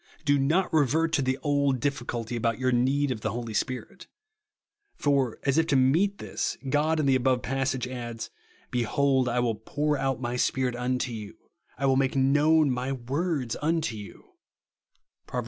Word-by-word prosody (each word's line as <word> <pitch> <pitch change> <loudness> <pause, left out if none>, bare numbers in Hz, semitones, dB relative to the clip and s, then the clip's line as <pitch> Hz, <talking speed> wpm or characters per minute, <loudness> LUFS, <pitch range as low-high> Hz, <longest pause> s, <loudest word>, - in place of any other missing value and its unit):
Do 145 -1 +3
not 160 +8 +1
revert 160 +2 +2
to 150 - +3
the 130 0 0
old 140 -3 +1
difficulty 120 -4 -3
about 115 -1 0
your 130 0 +1
need 135 +3 +2
of 110 -4 -4
the 110 - -1
Holy 115 0 -5
Spirit; 125 +4 -4 0.9
for, 140 -5 +1
as 140 +2 +2
if 160 - +1
to 145 - +2
meet 165 +11 +3
this, - - -3
God, 150 +3 +1
in 150 - +1
the 135 - +4
above 130 -1 +1
passage, 135 -1 -1
adds, 120 -3 -6 0.2
" - - -32
Be 125 - 0
hold 130 +2 +2
I 120 +1 0
will 120 -2 +1
pour 145 +7 -2
out 135 -3 -1
my 120 -1 -3
SjDirit 125 -1 0
unto 125 0 -1
you, 105 -3 -8 0.4
I 140 - -1
will 135 -1 +3
make 135 0 +1
known 145 +2 +4
my 125 +2 -2
words 135 +1 -2
unto 160 -6 0
you," 105 -2 -11 1.0
(iVoA'. - - -18
i. 125 - 0
130 Hz, 180 wpm, -27 LUFS, 125-145 Hz, 1.0 s, the